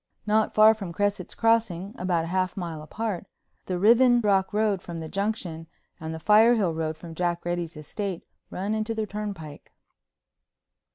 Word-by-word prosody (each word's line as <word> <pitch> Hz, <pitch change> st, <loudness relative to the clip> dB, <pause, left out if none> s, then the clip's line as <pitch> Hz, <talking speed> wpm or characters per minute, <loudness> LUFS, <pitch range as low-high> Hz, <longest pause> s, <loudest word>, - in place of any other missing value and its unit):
Not 215 Hz, 0 st, +1 dB
far 215 Hz, +1 st, +8 dB
from 200 Hz, -5 st, -7 dB
Cresset's 205 Hz, +3 st, -1 dB
Crossing, 220 Hz, -4 st, +1 dB
about 180 Hz, -5 st, 0 dB
a 165 Hz, -, -5 dB
half 185 Hz, +1 st, -1 dB
mile 170 Hz, -4 st, -4 dB
apart, 200 Hz, +3 st, -4 dB, 0.4 s
the 185 Hz, -, -1 dB
Riven 240 Hz, +5 st, +5 dB
Rock 195 Hz, -3 st, +2 dB
Road 210 Hz, -3 st, +1 dB
from 170 Hz, -1 st, -7 dB
the 160 Hz, -1 st, -5 dB
Junction 185 Hz, -5 st, -3 dB, 0.3 s
and 160 Hz, 0 st, -5 dB
the 160 Hz, -, -5 dB
Firehill 210 Hz, -1 st, +4 dB
Road 160 Hz, -1 st, -3 dB
from 165 Hz, 0 st, -10 dB
Jack 175 Hz, 0 st, -2 dB
Reddy's 175 Hz, -2 st, -3 dB
estate 185 Hz, +4 st, -5 dB, 0.2 s
run 200 Hz, +3 st, -3 dB
into 220 Hz, +1 st, -2 dB
the 220 Hz, -1 st, -1 dB
turnpike. 200 Hz, -8 st, -7 dB
190 Hz, 160 wpm, -26 LUFS, 170-215 Hz, 0.4 s, far